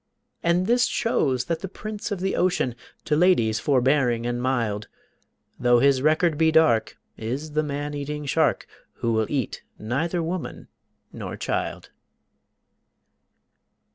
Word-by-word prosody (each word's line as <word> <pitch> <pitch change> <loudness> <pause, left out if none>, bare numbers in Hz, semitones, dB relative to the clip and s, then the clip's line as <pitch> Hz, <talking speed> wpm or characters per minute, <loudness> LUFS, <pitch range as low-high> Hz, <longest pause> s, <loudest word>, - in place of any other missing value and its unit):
And 170 +2 +2
this 245 +3 +3
shows 130 - 0
that 165 -1 -2
the 195 - -5
prince 215 +3 -6
of 200 -4 -3
the 190 +1 0
ocean, 180 -9 +1 0.3
To 150 - +1
ladies 150 -11 +3
forbearing 130 -3 +2
and 120 0 -2
mild, 115 -5 -1 0.7
Though 120 0 +4
his 135 +1 +4
record 155 +1 +2
be 160 0 +4
dark, 120 -9 +3 0.2
is 130 +8 -4
the 155 +1 +1
man 145 0 -4
eating 145 +1 -4
shark 155 +2 +1 0.3
Who 115 - -1
will 110 -1 +1
eat 135 -7 -2 0.2
neither 160 +10 -1
woman 170 +1 -5 0.4
nor - - -6
child. - - -3
145 Hz, 135 wpm, -24 LUFS, 120-170 Hz, 0.7 s, Though